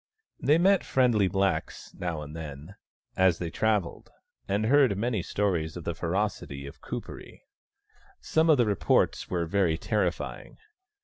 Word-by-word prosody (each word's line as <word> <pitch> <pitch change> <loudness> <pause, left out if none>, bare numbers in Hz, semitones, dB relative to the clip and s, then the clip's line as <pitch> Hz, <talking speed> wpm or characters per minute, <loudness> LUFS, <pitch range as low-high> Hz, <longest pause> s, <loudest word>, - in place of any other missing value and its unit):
They 150 +4 +3
met 190 +3 +4
friendly 120 -7 +2
blacks 95 +1 -2
now 85 -4 -4
and 75 +1 -9
then, 75 +2 -8 0.4
as 95 -3 +3
they 85 -2 -4
travelled, 105 -4 -1 0.4
and 100 +2 0
heard 130 -4 +4
many 110 -1 -1
stories 85 -4 -1
of 85 - -7
the 85 - -2
ferocity 85 -5 -3
of 70 - -11
Kuperee. - - -8 0.8
Some 160 +1 +1
of 155 - +6
the 120 - +3
reports 100 -4 +1
were 85 -2 -1
very 85 -2 +1
terrifying. 105 +4 -2
95 Hz, 140 wpm, -27 LUFS, 85-110 Hz, 0.8 s, of